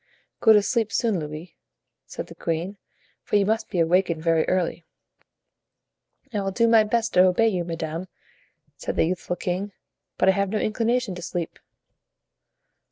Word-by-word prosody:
"Go 220 - +6
to 210 -1 +5
sleep 225 -1 0
soon, 220 -6 +1
Louis," 155 +3 -7 0.5
said - - -6
the - - -12
queen, 170 +5 -3 0.4
"for - - -2
you 200 -1 +4
must 220 +2 0
be - - -4
awakened 170 -1 +2
very 165 -1 +2
early." 180 -2 0 1.5
"I 205 - 0
will 195 - -1
do 230 +4 +2
my 225 -1 +6
best 225 +1 0
to 180 - +6
obey 225 +5 +3
you, 180 -4 -1
madame," 165 +1 -4 0.7
said - - -4
the - - +3
youthful 180 +1 -2
king, 185 +3 -3 0.4
"but - - +2
I - - +8
have 200 0 0
no 215 - -1
inclination 230 +1 0
to 180 - -8
sleep." 170 -1 -4
185 Hz, 165 wpm, -24 LUFS, 170-215 Hz, 1.5 s, I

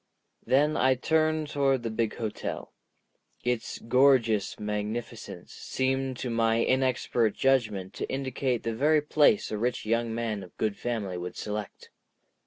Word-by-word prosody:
Then 150 +4 +3
I 130 +1 +4
turned 155 +3 +1
toward 135 -3 +1
the 115 - -2
big 110 -1 -1
hotel. 110 -3 -5 0.7
Its 125 -2 -2
gorgeous 115 -4 +3
magnificence 105 +2 -5
seemed 130 0 -2
to 125 - -3
my 115 0 +2
inexpert 125 -4 +1
judgment 110 -8 +1
to - - -5
indicate 130 -2 -1
the 115 - -2
very 150 +5 +3
place 155 +8 +3
a 105 - -2
rich 120 0 -1
young 115 +1 0
man 110 -3 -2
of 90 -2 -13
good 110 -2 0
family 105 -7 -3
would 90 +1 -6
select. 105 -1 -6
120 Hz, 140 wpm, -28 LUFS, 110-135 Hz, 0.7 s, I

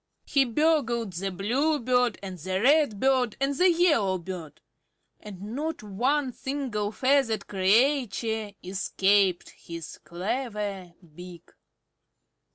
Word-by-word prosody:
He 275 -1 +3
burgled 240 - +1
the 195 +3 -3
Bluebird 245 - +1
and 190 -2 -6
the 185 +4 -2
Redbird 260 -2 +2
and 275 +1 0
the 360 +5 +4
Yellowbird; 190 - 0 0.6
and 205 -3 -10 0.2
not 310 -2 -3
one 255 +7 0
single 260 -7 -3
feathered 260 -2 +1
creature 220 +1 +1
escaped 190 0 +1
his 170 -1 -9
clever 195 +1 -4 0.2
beak. 175 0 -12
220 Hz, 95 wpm, -27 LUFS, 190-270 Hz, 0.6 s, the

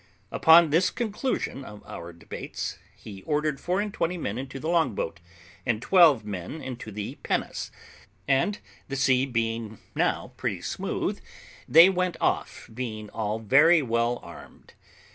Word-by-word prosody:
Upon 160 -1 +6
this 170 +4 +4
conclusion 225 - -3
of 105 -4 -11
our 85 0 -8
debates, 85 0 -6 0.2
he 100 -3 -11
ordered 150 +3 -1
four 180 +2 -1
and 205 -1 -2
twenty 180 +2 -1
men 115 -8 -3
into 135 0 -6
the 155 - -5
long 165 - +2
boat, 85 -1 -3 0.4
and 120 -4 0
twelve 150 - +5
men 100 - -5
into 125 -6 -7
the 105 0 -6
pinnace, - - -2 0.6
and 140 +10 +2 0.3
the 135 - -4
sea 130 0 +3
being 115 -3 -2 0.2
now - - 0
pretty - - -2
smooth, - - -3 0.5
they 165 +3 +9
went 180 -2 0
off, - - -1
being 110 -3 -5
all 110 -1 -2
very 145 +9 +5
well 115 0 0
armed. - - -13
130 Hz, 145 wpm, -26 LUFS, 110-165 Hz, 0.6 s, they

